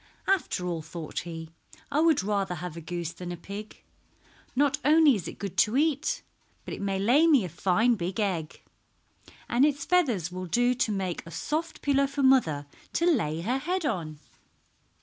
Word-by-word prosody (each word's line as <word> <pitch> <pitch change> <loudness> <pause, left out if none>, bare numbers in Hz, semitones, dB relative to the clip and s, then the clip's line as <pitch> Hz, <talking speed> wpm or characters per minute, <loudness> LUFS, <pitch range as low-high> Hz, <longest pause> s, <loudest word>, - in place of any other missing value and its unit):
"After 370 - 0
all," 170 -2 -2
thought 155 0 -6
he, 165 -2 -7 0.4
"I 290 - +2
would 315 - +4
rather 195 -3 -1
have 175 -1 -6
a 170 - -7
goose 170 0 -4
than 175 +1 -7
a 175 - -5
pig. 200 +5 -9 0.7
Not 285 +1 +2
only 305 0 +6
is 185 -8 -3
it - - -8
good 195 -2 -6
to 220 +5 +3
eat, 315 - +1 0.4
but - - -6
it - - -6
may 195 -1 -1
lay 250 +12 +4
me 280 - +5
a - - -5
fine 195 +8 +2
big 185 -1 -3
egg, 175 -7 -2 0.8
and 240 +3 +2
its 285 -1 +2
feathers 245 - +2
will 185 0 -5
do 245 +8 +2
to 245 -3 0
make 190 -4 -2
a - - -11
soft 315 - -3
pillow 280 -1 +3
for 280 0 -2
mother 170 - +4 0.3
to 340 - +1
lay 165 - +1
her 245 +9 0
head 350 +4 -2
on." 165 - -2
210 Hz, 185 wpm, -28 LUFS, 175-280 Hz, 0.8 s, only